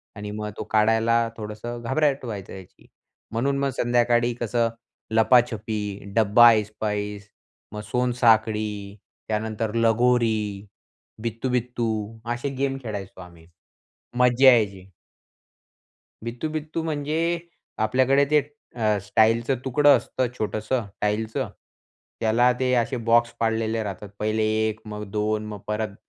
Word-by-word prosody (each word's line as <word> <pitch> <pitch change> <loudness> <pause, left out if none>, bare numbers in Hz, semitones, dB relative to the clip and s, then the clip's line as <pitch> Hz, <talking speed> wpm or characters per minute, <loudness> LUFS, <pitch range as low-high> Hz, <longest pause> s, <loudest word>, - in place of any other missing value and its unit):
आणि 105 0 -6
मग 105 0 -4
तो - - -4
काढायला 115 +2 +3
थोडंसं 110 +3 -6
घबराहट 140 +2 +1
व्हायचं 100 -5 -6
याची, 95 -2 -13 0.4
म्हणून 135 +5 0
मग 140 0 +1
संध्याकाळी 120 0 +2
कसं 115 0 +1 0.5
लपाछपी, 110 -3 +2 0.2
डबा 115 +2 +7
ऐसपैस, 105 -1 -3 0.4
मग 105 - -5
सोनसाखळी, 110 -4 +1 0.3
त्यानंतर 110 0 -2
लगोरी, 115 -3 +2 0.6
बित्तू-बित्तू 120 0 -2 0.4
असे 120 +4 -3
गेम 135 0 -1
खेळायचो 100 -4 -6
आम्ही. 85 -2 -14 0.7
मज्जा 125 +1 +6
यायची. 100 -5 0 1.3
बित्तू-बित्तू 155 +7 -4
म्हणजे 160 +2 -1 0.5
आपल्याकडे 130 +4 +3
ते 150 - +6 0.4
अ, 110 -3 +1
स्टाईलचं 115 +5 +2
तुकडं 145 +1 +5
असतं 125 +2 -2
छोटंसं 110 +2 -2 0.2
टाईलचं. 110 +5 -1 0.7
त्याला 120 +3 +3
ते 130 -1 +1
असे 125 +2 0
बॉक्स 120 0 +4
पाडलेले 115 0 0
राहतात. 100 0 -6
पहिले 110 +1 0 0.2
1, 110 0 -4
मग 105 0 -6
2, 105 0 -1
मग 105 -2 -7
परत 105 -1 -2
115 Hz, 110 wpm, -24 LUFS, 105-125 Hz, 1.3 s, डबा